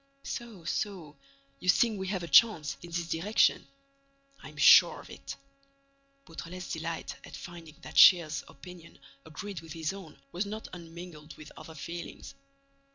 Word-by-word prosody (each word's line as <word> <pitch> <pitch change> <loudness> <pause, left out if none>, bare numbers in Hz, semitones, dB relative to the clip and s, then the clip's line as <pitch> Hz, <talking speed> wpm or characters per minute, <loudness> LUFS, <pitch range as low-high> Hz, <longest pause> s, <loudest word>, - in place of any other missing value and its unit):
"So—so—you 160 - -6
think 220 +2 +3
we 190 - -4
have 185 -2 -2
a - - -5
chance—in 170 -7 +4
this 170 0 -3
direction." 185 +7 +2 0.7
"I'm - - -12
sure - - +7
of - - -13
it." - - -8 0.9
Beautrelet's 170 +2 -8
delight 165 0 -4
at - - -10
finding 170 -3 -10
that - - 0
Shears's 160 -6 +7
opinion 170 +4 -13 0.3
agreed 180 +4 -7
with 165 -2 -10
his 160 +1 -3
own 190 -6 -11
was 185 +4 -2
not 215 +2 -6
unmingled 165 -3 -10
with 155 - -12
other 160 0 -11
feelings. 170 +2 -8
170 Hz, 135 wpm, -30 LUFS, 155-185 Hz, 0.9 s, sure